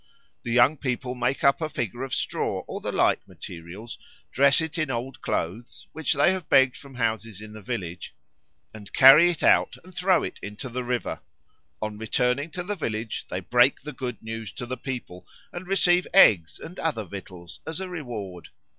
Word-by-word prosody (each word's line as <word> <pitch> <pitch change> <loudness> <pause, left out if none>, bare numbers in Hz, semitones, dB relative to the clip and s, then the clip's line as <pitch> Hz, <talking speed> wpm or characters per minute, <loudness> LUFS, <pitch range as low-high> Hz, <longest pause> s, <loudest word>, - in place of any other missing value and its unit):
The 120 - -5
young 125 +6 +5
people 125 -2 -3
make 130 +2 -1
up 140 +3 +4
a 155 - -1
figure 120 -3 -4
of 135 0 -4
straw - - -2
or - - -6
the - - -3
like - - +2
materials, 90 +7 -10 0.3
dress 140 +2 +5
it 160 +1 -3
in 155 -3 0
old 125 +1 -4
clothes, 105 +9 -4
which 160 -2 -1
they 145 +5 +4
have 185 -4 -4
begged 130 -1 +5
from 140 -2 -12
houses 110 -4 -2
in 105 0 -10
the 110 - -10
village, 95 -7 -5 0.6
and 105 -2 -11
carry 145 +6 +8
it 170 - -3
out - - +4
and 185 +1 -15
throw 180 0 +2
it - - -6
into 105 +5 -7
the 125 +1 -4
river. 125 0 -2 0.6
On 105 -1 -4
returning 125 +6 0
to 180 +1 -5
the 205 +4 -3
village 110 - -4
they 90 - -3
break 120 +7 +3
the 150 +2 -7
good 125 -3 -6
news 110 -1 -6
to 125 - -6
the 130 +1 -4
people, 120 -10 -7 0.3
and 175 +1 -7
receive 180 -2 +3
eggs 90 - +6
and 180 - -10
other 150 -9 -1
victuals 90 -2 -10
as 160 +2 -3
a 190 - -4
reward. 115 - -7
125 Hz, 190 wpm, -25 LUFS, 110-150 Hz, 0.6 s, carry